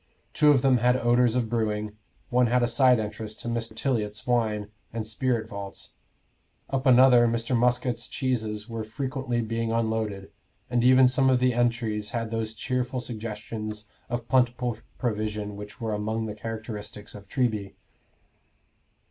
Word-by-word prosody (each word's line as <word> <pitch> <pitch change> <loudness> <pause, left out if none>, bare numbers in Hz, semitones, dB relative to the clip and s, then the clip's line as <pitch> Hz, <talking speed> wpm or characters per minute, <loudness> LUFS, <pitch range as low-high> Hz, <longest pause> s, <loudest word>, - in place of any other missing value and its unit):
Two 150 - +4
of 140 -3 +5
them 130 -2 +5
had 125 +1 +3
odors 120 0 +3
of 120 -3 +1
brewing; 105 -2 -1 0.4
one 125 0 +4
had 125 +1 +2
a - - +3
side 125 0 +4
entrance 105 0 -5
to 120 - -8
Mr. 115 -1 -3
Tiliot's 105 -5 -2
wine 110 -4 0 0.2
and 115 -1 -4
spirit 115 0 -1
vaults; 100 -2 -8 0.8
up 135 0 0
another 125 -1 +7
Mr. 115 +2 0
Muscat's 120 0 +1
cheeses 110 -5 -2
were 115 -2 -4
frequently 130 +1 -2
being 115 0 -2
unloaded; 110 -3 -1 0.4
and 120 -1 +2
even 130 +1 +7
some 130 +1 +3
of 130 - +4
the 125 0 +2
entries 115 -3 0
had 115 0 -3
those 110 -1 -2
cheerful 125 +2 -2
suggestions 110 -2 -5 0.2
of 120 -1 -3
plentiful 125 -2 +1 0.2
provision 105 -3 -2
which 105 +3 -9
were 110 -3 -2
among 110 +2 -2
the 105 - -4
characteristics 110 -1 -7
of 100 -1 -12
Treby. 110 -7 -1
115 Hz, 150 wpm, -26 LUFS, 110-125 Hz, 0.8 s, another